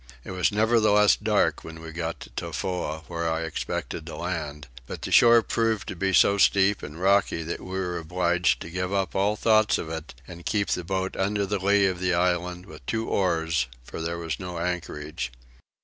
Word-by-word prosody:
It -, -, -8 dB
was 90 Hz, -1 st, +1 dB
nevertheless 105 Hz, -1 st, +4 dB
dark 105 Hz, -1 st, +1 dB
when 80 Hz, 0 st, -9 dB
we 80 Hz, 0 st, -8 dB
got 85 Hz, 0 st, -4 dB
to -, -, -10 dB
Tofoa 90 Hz, -4 st, -3 dB
where 85 Hz, -1 st, -2 dB
I 80 Hz, 0 st, -1 dB
expected 80 Hz, -, -4 dB
to -, -, -6 dB
land, 75 Hz, -5 st, -4 dB, 0.2 s
but -, -, -7 dB
the -, -, -4 dB
shore 115 Hz, -1 st, +7 dB
proved 115 Hz, -3 st, 0 dB
to -, -, -4 dB
be 95 Hz, +3 st, 0 dB
so 100 Hz, +2 st, +5 dB
steep 100 Hz, +1 st, +4 dB
and 75 Hz, +3 st, -8 dB
rocky 95 Hz, -3 st, +2 dB
that 85 Hz, -, -5 dB
we 95 Hz, 0 st, -5 dB
were 90 Hz, -2 st, -2 dB
obliged 90 Hz, +1 st, +1 dB
to 85 Hz, -, -9 dB
give 90 Hz, +1 st, -2 dB
up 95 Hz, -1 st, 0 dB
all 100 Hz, +2 st, +1 dB
thoughts 110 Hz, -1 st, +3 dB
of 80 Hz, -, -5 dB
it 80 Hz, -4 st, -6 dB
and 85 Hz, 0 st, -10 dB
keep 100 Hz, +1 st, 0 dB
the 90 Hz, -, 0 dB
boat 95 Hz, +2 st, -2 dB
under 100 Hz, +1 st, 0 dB
the 100 Hz, +1 st, -1 dB
lee 100 Hz, 0 st, +4 dB
of 95 Hz, -2 st, 0 dB
the 90 Hz, -1 st, +1 dB
island 90 Hz, 0 st, 0 dB
with 75 Hz, -5 st, -12 dB
two 110 Hz, 0 st, -1 dB
oars, 80 Hz, -6 st, +1 dB, 0.2 s
for 70 Hz, -, -7 dB
there 85 Hz, +1 st, -2 dB
was 85 Hz, -1 st, -4 dB
no 90 Hz, -2 st, -6 dB
anchorage. 80 Hz, -6 st, -4 dB
90 Hz, 200 wpm, -26 LUFS, 85-100 Hz, 0.2 s, shore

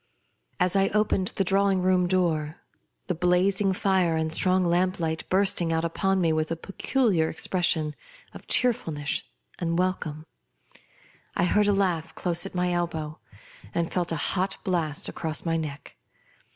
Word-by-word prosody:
As 180 Hz, 0 st, +1 dB
I 195 Hz, 0 st, +4 dB
opened 210 Hz, -3 st, +1 dB
the 195 Hz, -, +1 dB
drawing 195 Hz, 0 st, +2 dB
room 185 Hz, -1 st, +3 dB
door, 165 Hz, -4 st, 0 dB, 0.5 s
the 180 Hz, -, -1 dB
blazing 180 Hz, +3 st, +2 dB
fire 185 Hz, -4 st, +1 dB
and 160 Hz, 0 st, -1 dB
the -, -, +2 dB
strong 185 Hz, +1 st, +3 dB
lamp 180 Hz, +2 st, +1 dB
light 160 Hz, -1 st, -3 dB
bursting 185 Hz, -3 st, +2 dB
out 160 Hz, 0 st, 0 dB
upon 195 Hz, +3 st, 0 dB
me 165 Hz, -3 st, +2 dB
wkh 155 Hz, 0 st, 0 dB
a 165 Hz, -, -1 dB
peculiar 195 Hz, -1 st, 0 dB
expression 160 Hz, -3 st, +1 dB, 0.4 s
of -, -, -12 dB
cheerfulness 160 Hz, -, +1 dB, 0.4 s
and 170 Hz, -1 st, -1 dB
welcome, 160 Hz, -4 st, -2 dB, 1.1 s
I -, -, +1 dB
heard 210 Hz, +3 st, +3 dB
a -, -, +4 dB
laugh 180 Hz, -5 st, -1 dB
close 175 Hz, +1 st, +1 dB
at 195 Hz, -, -12 dB
my 180 Hz, 0 st, 0 dB
elbow, 160 Hz, -3 st, -3 dB, 0.6 s
and 170 Hz, -1 st, -1 dB
felt 175 Hz, -2 st, -1 dB
a -, -, 0 dB
hot 190 Hz, +5 st, -1 dB
blast 165 Hz, -5 st, -1 dB
across 160 Hz, 0 st, -3 dB
my 165 Hz, -1 st, 0 dB
neck. 150 Hz, -4 st, -5 dB
180 Hz, 155 wpm, -26 LUFS, 160-190 Hz, 1.1 s, I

